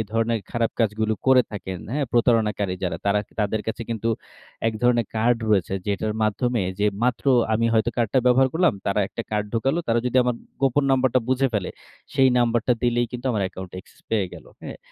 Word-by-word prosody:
ধরনের 115 0 +1
খারাপ 115 -1 0
কাজগুলো 110 0 +1
করে 130 -1 +6
থাকেন 95 -3 -5
হ্যাঁ? 145 0 0
প্রতারণাকারী 110 -5 +2
যারা 90 - -1
তারা 100 +1 +3 0.2
তাদের 105 +1 0
কাছে 110 - -3
কিন্তু 115 0 -2 0.6
এক - - -2
ধরনের 120 -3 +3
কার্ড 115 +2 +3
রয়েছে 95 -2 +2
যেটার 105 +1 -1
মাধ্যমে 115 +1 0 0.2
যে, 105 - +3 0.2
মাত্র 125 -1 0 0.3
আমি 115 +1 +2
হয়তো 110 +1 +2
কার্ডটা 120 +1 +1
ব্যবহার 130 +1 +5
করলাম, 175 0 +3
তারা 100 +1 +1
একটা 115 - -5
কার্ড 105 -1 -1
ঢোকালো। 135 +8 +1
তারা 115 0 +3
যদি 125 - -1
আমার 125 0 0 0.3
গোপন 135 +1 +2
নাম্বারটা 130 -1 +3
বুঝে 130 +1 +2
ফেলে 100 -3 -1 0.4
সেই 135 -2 +5
নাম্বারটা 120 0 +2
দিলেই 120 0 +2
কিন্তু 125 +1 -5
আমার 105 -4 0
অ্যাকাউন্ট 95 -1 -7
access - - -23
পেয়ে 105 -4 +1
গেল। - - -12 0.2
হ্যাঁ? - - -8
115 Hz, 185 wpm, -23 LUFS, 105-125 Hz, 0.6 s, করে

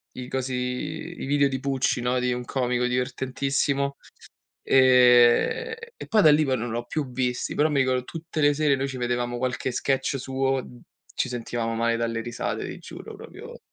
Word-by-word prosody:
i 125 -1 -6
cosi 130 0 -3
i 150 +7 -4
video 140 0 +3
di 130 -1 -4
Pucci 135 -2 0
no, 125 +1 +1
di 125 0 0
un 125 0 -4
comico 125 -1 -1
divertentissimo. 135 +2 -1 0.7
Ehm, 125 - +5 0.2
e - - -8
poi 220 -1 +4
da 155 -5 +7
lì 150 +1 +4
poi 130 -2 +1
non 120 +1 -4
li 115 - -2
ho 120 - -4
più 145 -5 -3
visti, 125 0 -2
però 150 +2 +3
mi 145 -2 +1
ricordo 130 -1 +1
tutte 165 -1 -6
le 145 -1 +4
sere 150 -1 +2
noi 135 +1 -1
ci 130 - -6
vedevamo 120 0 -1
qualche 130 +1 -2
sketch 135 +2 0
suo, 135 0 -1 0.5
ci - - -1
sentivamo 120 -1 -3
male 115 0 +1
dalle 115 -1 -2
risate, 120 0 -4
ti - - -7
giuro, - - -10
proprio - - -11
130 Hz, 185 wpm, -25 LUFS, 125-140 Hz, 0.7 s, da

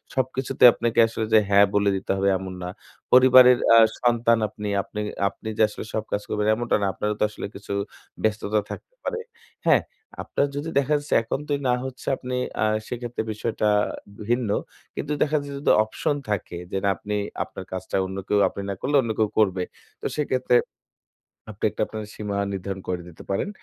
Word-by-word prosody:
সবকিছুতে 130 0 -1
আপনাকে 115 0 0
আসলে 110 0 -3
যে 110 - +8
"হ্যাঁ" 100 0 +7
বলে 100 0 +3
দিতে 95 - -3
হবে 100 0 +2
এমন 95 0 -7
না। 90 - -4 0.4
পরিবারের 125 -1 +8 0.2
আ - - +8 0.2
সন্তান 120 -1 +3
আপনি, 105 0 -6
আপনি, 105 - -7 0.3
আপনি 110 - -12
যে - - +1
আসলে 105 - -8
সব 110 - -1
কাজ 105 - 0
করবেন 105 0 0
এমনটা 120 +1 0
না। 100 - +1
আপনারও 105 +4 -2
তো - - +2
আসলে 105 - -7
কিছু 100 0 -6 0.5
ব্যস্ততা 110 -1 +1
থাকতে - - -9
পারে। 470 - -2 0.5
হ্যাঁ? - - +5 0.4
আপনার 145 - 0
যদি 145 +3 -3
দেখা 140 +2 0
যাচ্ছে 145 0 -4
এখন 115 - -2
তো - - -5 0.2
না 125 - +4
হচ্ছে 130 -1 -8
আপনি 125 0 -4 0.3
আ - - +4 0.2
সেক্ষেত্রে 120 -1 -4
বিষয়টা 110 0 -1 0.6
ভিন্ন। 120 -3 +1 0.5
কিন্তু 150 - -4
দেখা 155 +1 +2
যাচ্ছে 140 0 -7
যদি - - +3
অপশন 110 +6 -2
থাকে, 100 -4 -2
যে - - -1
না 100 - +3
আপনি 105 0 -4 0.3
আপনার 95 - -9
কাজটা 95 0 -4
অন্য 95 +1 -6
কেউ 105 - +2
আপনি 100 - -7
না 100 - -1
করলে 145 +2 0
অন্য 115 -3 -2
কেউ 110 -1 +3
করবে। 95 -4 +2 0.4
তো - - -8
সেক্ষেত্রে 130 -4 +1 1.0
আপনি 100 - -15
একটা - - -6
আপনার 110 -1 -6
সীমা 105 -1 -3 0.2
নির্ধারণ 95 0 -4
করে 90 -1 -1
দিতে 80 - -13
পারেন। 100 - -1
110 Hz, 185 wpm, -24 LUFS, 100-125 Hz, 1.0 s, যে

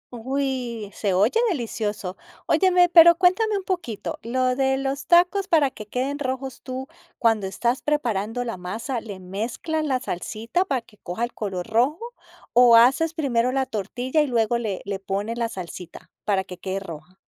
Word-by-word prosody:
Uy. 245 -4 -3
Se 195 -4 -1
oye 215 - +3
delicioso. 215 - -3 0.3
Óyeme, 360 -2 +4
pero 340 -1 +8
cuéntame 405 +4 +3
un 390 - -4
poquito, 350 - -4
lo 255 +2 0
de 265 0 +1
los 275 +1 -3
tacos 360 +3 +4
para 310 -8 +3
que 215 -5 -10
queden 270 +5 -2
rojos, 265 -1 -4
tú, 260 +1 -6 0.3
cuando 225 -4 +2
estás 240 +6 -1
preparando 240 -6 -1
la 230 -5 -4
masa, 225 +7 -4
¿le 200 -4 -8
mezclas 230 - -3
la 265 -4 0
salsita 225 - -2
para 270 -9 -1
que 210 - -22
coja 180 +6 -4
el 240 - -2
color 190 -4 -4
rojo?, 250 +9 +2 0.5
o, 240 -1 +7
¿haces 275 +8 +5
primero 255 -6 +1
la 265 0 0
tortilla 245 - -1
y 300 - +1
luego 235 -1 +1
le 205 -5 -3
le 200 -1 -3
pones 200 +4 -3
la 230 -1 0
salsita, 180 -3 -9
para 195 -2 +1
que 180 -1 -10
quede 190 +1 -3
roja? 170 -1 -10
240 Hz, 170 wpm, -24 LUFS, 205-275 Hz, 0.5 s, pero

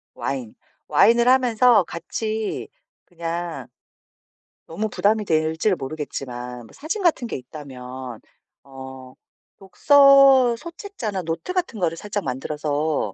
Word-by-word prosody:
와인. 130 -5 -4 0.3
와인을 235 +2 +4
하면서 250 -3 +5
같이 215 +6 -4 0.4
그냥 170 -5 -5 1.0
너무 210 +7 -3
부담이 210 +2 +1
될지는 160 +4 +1
모르겠지만 130 -4 -6
뭐 - - -15
사진 325 +9 -4
같은 310 -8 +2
게 - - -5
있다면 130 -3 -9 0.4
어 130 -1 -11 0.5
독서 275 +3 +6
소책자나 330 - -6
노트 165 - -4
같은 350 - -2
거를 165 -3 0
살짝 205 +2 -4
만들어서 150 +3 -2
170 Hz, 240 characters per minute, -22 LUFS, -, 1.0 s, 독서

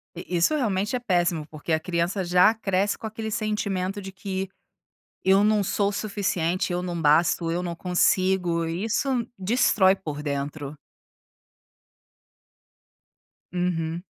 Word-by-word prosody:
I 175 - -7
isso 175 - +3
realmente 210 -4 0
é - - 0
péssimo 175 -8 0
porque 155 +2 -6
a 160 - +3
criança 175 +3 -1
já 180 +4 +5
cresce 200 -2 0
com - - -9
aquele 220 0 -5
sentimento 205 -3 -2
de 195 0 -7
que, 190 0 -4 0.8
eu 190 +1 +5
não 210 0 +3
sou 200 +1 +1
suficiente, 190 -4 -1
eu 175 - -1
não 175 -2 -3
basto, 165 +2 +3
eu 175 +2 -1
não 170 -1 -4
consigo, 180 -1 +2
e 165 +4 -3
isso 230 +5 0 0.3
destrói 195 -2 +3
por 150 -6 -6
dentro. 145 0 -4 2.8
Uhum. 175 -2 -1
185 Hz, 130 wpm, -25 LUFS, 170-200 Hz, 2.8 s, já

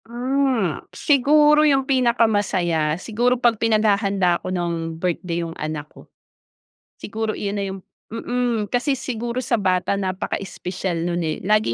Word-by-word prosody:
Ah, 245 - 0
siguro 295 +2 +4
yung 275 -3 +3
pinakamasaya 205 - +1
siguro 240 +6 0
pag 235 -3 +2
pinaghahanda 200 -5 +2
ko - - -5
ng 170 -2 -2
birthday 170 0 -2
yung 165 - -6
anak 155 -1 -5
ko. - - -16 0.9
Siguro 220 +1 -3
iyun 205 0 -3
na 200 - -1
yung 195 - -8 0.3
mm. 235 -2 -1
Kasi 255 +4 +1
siguro 240 -1 -3
sa 235 - 0
bata 185 -1 +1
napaka-espesyal 185 -2 -3
no'n, 175 0 -1
eh, 155 -1 -2
lagi 210 - +2
210 Hz, 135 wpm, -22 LUFS, 180-245 Hz, 0.9 s, siguro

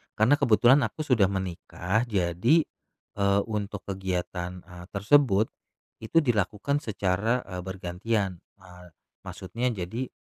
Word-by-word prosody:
karena 110 +7 +4
kebetulan 125 +1 +5
aku 155 - -6
sudah 120 -9 +3
menikah. 95 +3 -2
Jadi, 100 - +2 0.6
eee, 100 0 +3
untuk 105 -2 -4
kegiatan, 90 -2 -4
eee, 90 -1 -12
tersebut 110 0 +3 0.5
itu 110 +9 -2
dilakukan 115 +3 0
secara, 110 +1 0
eee, 90 - -7
bergantian. 95 +1 -2 0.2
Eee, 90 -2 -15 0.4
maksudnya 115 +7 -3
jadi, 105 +8 -4
100 Hz, 110 wpm, -27 LUFS, 90-115 Hz, 0.6 s, kebetulan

